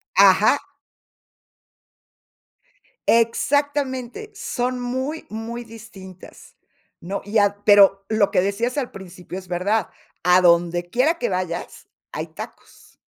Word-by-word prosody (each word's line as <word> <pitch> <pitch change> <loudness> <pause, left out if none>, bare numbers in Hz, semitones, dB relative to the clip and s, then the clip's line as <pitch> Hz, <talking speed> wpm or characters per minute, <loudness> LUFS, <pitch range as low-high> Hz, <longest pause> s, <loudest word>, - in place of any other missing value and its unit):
Ajá. - - +6 2.5
Exactamente, 270 - 0
son 250 -5 -3
muy, 260 +6 -3
muy 230 +2 -6
distintas, 215 -5 -13 0.4
¿no? 195 +3 -5
Y 210 +2 -1
ad 205 0 +3
pero 195 -1 +6
lo 215 -2 +2
que 180 - +3
decías 230 +7 -1
al 265 -4 -2
principio 185 -1 -9
es 185 - -15
verdad, 185 +3 0 0.3
adondequiera 175 - +3
que - - -2
vayas, 180 -2 -4 0.2
hay - - -5
tacos. - - -12
215 Hz, 100 wpm, -22 LUFS, 185-245 Hz, 2.5 s, Ajá